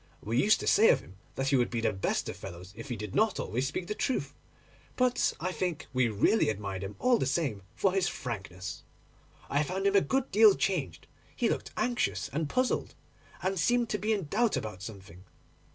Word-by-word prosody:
We 115 +4 +1
used 215 - +4
to - - -4
say 225 - +6
of - - +4
him 95 - -16 0.2
that 135 0 0
he 140 - +3
would 125 -2 +2
be 120 - -2
the 115 - +1
best 95 - -1
of - - -4
fellows, 90 +2 -9
if 115 +5 -9
he 120 - -2
did 105 -2 -6
not 220 -3 +2
always 125 +5 -1
speak 160 +6 -3
the 210 - -3
truth, 255 +4 -2 0.6
but 250 -1 +2
I 185 +3 -2
think 180 -4 -2
we 130 -1 +3
really 110 - +3
admired 100 -2 -3
him 100 +1 -6
all 250 -2 +3
the - - 0 0.2
more 100 - -13
for 195 -2 +2
his 190 -2 +2
frankness. 95 - -5 0.7
I 145 - +1
found 185 +6 -2
him 200 0 +3
a 200 - +7
good 265 +4 -1
deal 210 0 +7
changed. 155 - -2 0.3
He - - +1
looked - - -2
anxious 215 - 0
and 150 +2 -2
puzzled, 255 - 0 0.5
and 190 0 0
seemed 240 +7 +2
to 210 - -1
be 215 +4 0
in 205 -3 +1
doubt 230 +9 +1
about 105 -4 -5
something. 95 -4 -10
145 Hz, 210 wpm, -30 LUFS, -, 0.7 s, a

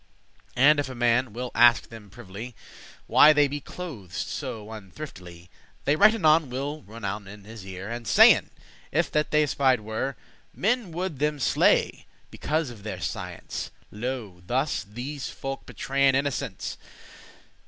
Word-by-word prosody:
And 145 +3 +5
if 140 - -2
a 130 - -7
man 120 0 +2
will 125 +3 -5
ask 120 -1 +5
them 110 -3 -12
privily, 110 +2 -9 0.5
Why 155 - +7
they 145 -1 +4
be 145 +1 -4
clothed 130 - -9
so 105 +5 -5
unthriftily,* 105 -4 -10
*shabbily 90 - -10 0.4
They 145 - +3
right 210 +6 +6
anon 155 - +4
will 140 +4 -4
rownen* 105 -3 -6
in 105 +1 -11
his 110 -1 -10
ear, 95 0 -7
*whisper 115 - -3
And 120 -2 -11
sayen, - - +6 0.4
if - - +1
that 150 0 +1
they 150 0 +3
espied 135 -4 +2
were, 110 +5 -3 0.4
Men 225 -2 0
would 175 -3 -4
them 150 0 0
slay, 135 - +2 0.2
because 155 -3 -2
of 110 -4 -12
their 110 +1 -6
science: - - -5 0.2
Lo, 110 -5 -5
thus 135 +5 0
these 125 +7 -6
folk 135 0 -6
betrayen 135 0 +1
innocence! 140 0 -2
125 Hz, 155 wpm, -26 LUFS, 110-145 Hz, 0.5 s, Why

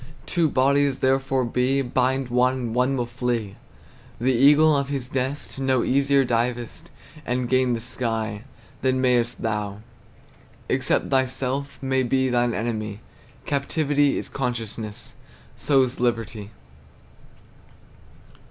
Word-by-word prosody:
Two 170 -3 +1
bodies 140 +1 +2
therefore 135 -1 +1
be; 125 +3 +1
Bind 130 +1 0
one, 125 +1 +3
and 120 -3 -4
one 125 +3 +1
will 120 - -1
flee. 120 -4 -3 0.6
The 130 +3 +2
eagle 145 +5 +5
of 140 0 -1
his 135 -3 -4
nest 135 +1 -3
No 130 -2 +1
easier 140 0 +3
divest 120 0 -2 0.3
And 125 -1 -1
gain 130 0 +2
the - - -4
sky, 115 -3 -3 0.4
Than 130 0 +1
mayest 125 -2 +1
thou, 105 -2 -2 0.9
Except - - 0
thyself 135 +1 -1
may 130 0 +1
be 130 +1 +1
Thine 120 -1 +1
enemy; 110 -2 -3 0.5
Captivity 145 0 +1
is - - -4
consciousness, 115 -5 -5 0.4
So's 130 -3 +1
liberty. 115 -3 -2
130 Hz, 115 wpm, -24 LUFS, 120-135 Hz, 0.9 s, eagle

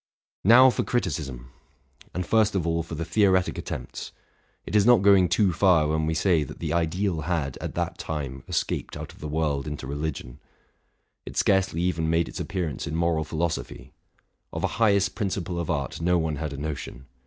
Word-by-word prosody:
Now 125 +6 +8
for - - -1
criticism! 70 - -3 0.6
and 90 0 -3
first 110 +2 +3
of 90 -4 0
all 85 0 +1
for 85 0 -7
the 85 +1 -3
theoretic 95 +1 +2
at - - -7
tempts. - - -6 0.5
It - - -5
is 105 - +6
not 120 -3 +5
going 100 -3 +6
too 90 +2 +3
far 85 -4 +4
when 80 0 0
we 80 - 0
say 85 -2 +2
that 70 - -9
the 80 -3 -3
ideal 85 +1 0
had, 75 -4 -2
at - - -6
that - - -2
time, 70 -4 -5
escaped - - -2
out - - -8
of - - -18
the 75 - -5
world 75 -2 -1
into 75 -2 -5
religion; 70 -3 -5 0.8
it - - -9
scarcely 95 -4 +2
even 80 -3 0
made 80 0 +2
its - - -7
appearance 85 -7 -3
in 75 - -3
moral 85 -1 +1
philosophy; 80 +2 -4 0.6
of - - -5
a 115 - -2
highest 100 -3 +3
principle 95 -4 -3
of 85 - -3
art 70 -2 -2
no 90 +1 +3
one 80 -3 -1
had 75 0 -4
a 70 - -6
notion. 70 -3 -6
85 Hz, 190 wpm, -26 LUFS, 75-95 Hz, 0.8 s, Now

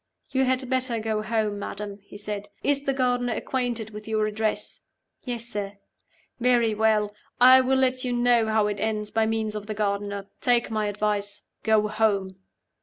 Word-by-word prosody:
"You 265 0 +2
had 260 0 0
better 255 -2 0
go 220 -1 -1
home, 215 -2 -1
madam," 205 0 -6
he 205 0 -12
said. 205 0 -5
"Is 285 0 +1
the 275 - +2
gardener 245 -2 +1
acquainted 240 -4 -2
with 210 0 -9
your 215 -1 +1
address?" 215 0 -2 0.4
"Yes, 240 -2 -3
sir." 205 -3 -4 0.6
"Very 240 -2 +3
well. 215 -1 +2 0.3
I 255 +1 +9
will 260 +1 +2
let 255 -1 +1
you 250 - -1
know 240 -2 +3
how 215 -1 +2
it 205 -1 -2
ends 215 -1 -2
by 220 0 +2
means 220 -1 -1
of 210 -1 -6
the 215 - -4
gardener. 200 -1 -2
Take 240 -2 +2
my 215 -1 0
advice. 205 0 -1 0.2
Go 215 -1 +3
home." 205 -3 0
220 Hz, 175 wpm, -26 LUFS, 210-245 Hz, 0.6 s, I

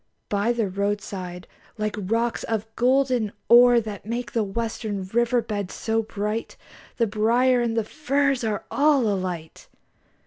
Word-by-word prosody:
By 205 +3 +1
the 235 -3 0
roadside, 195 -2 -3 0.3
like 215 -1 -2
rocks 225 +4 -1
of 220 -2 -2
golden 250 -3 +2 0.2
ore 240 0 +8
That 210 -3 -6
make 230 0 -4
the 225 -1 +1
western 210 -1 -3
river 235 +3 +1
beds 205 -3 -4
so 225 0 0
bright, 215 +1 -4 0.4
The 235 - +3
briar 235 +4 +2
and 230 -1 -1
the 225 - +2
furze 280 +1 0
are 215 -2 -2
all 285 -4 +3
alight! 185 -5 -4
225 Hz, 140 wpm, -24 LUFS, 205-240 Hz, 0.4 s, ore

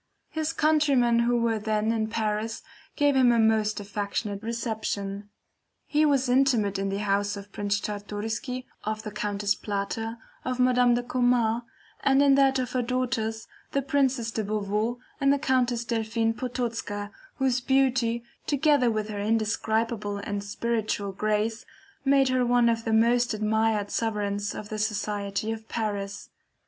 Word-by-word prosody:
His 315 0 -1
countrymen 290 -7 +3
who 240 +1 +2
were 230 -2 +1
then 215 +1 0
in 220 -1 0
Paris 220 0 -2 0.3
gave 290 -1 +3
him 255 -2 +5
a 235 - +3
most 220 -1 +2
affectionate 205 0 -3
reception. 215 -3 -3 0.6
He 305 +1 +3
was 275 -3 +2
intimate 245 -6 +2
in 195 0 -1
the 195 - -2
house 205 +1 +1
of 200 0 -10
Prince 205 0 -1
Czartoryski, 215 +6 -4 0.2
of 215 0 -3
the 215 - -5
Countess 205 0 0
Plater, 220 +3 -3 0.3
of 255 0 -3
Madame 250 -1 +4
de 245 - -1
Komar, 245 -2 +1 0.4
and 275 +1 +4
in 280 -1 +6
that 270 -1 +4
of 255 -1 -2
her 255 - 0
daughters, 235 -3 -2 0.3
the 275 - +1
Princess 265 -5 +1
de 220 - -2
Beauveau 210 +3 -1 0.2
and 275 -1 +4
the 285 - +3
Countess 250 -4 +1
Delphine 225 0 0
Potocka, 230 -5 -3 0.2
whose 260 -2 +1
beauty, 255 -3 +2 0.2
together 285 -3 +3
with 215 -2 -1
her 205 -1 -4
indescribable 220 0 0
and 200 0 -4
spiritual 210 -1 -2
grace, 215 +3 -1 0.4
made 270 -1 +4
her 255 -1 +2
one 240 -1 +4
of 230 -1 -1
the 225 - 0
most 235 +1 +3
admired 215 -1 +1
sovereigns 205 -2 -1
of 210 - -7
the 215 - -4
society 210 0 -2
of 220 0 -6
Paris. 205 -3 -3
225 Hz, 150 wpm, -27 LUFS, 210-250 Hz, 0.6 s, in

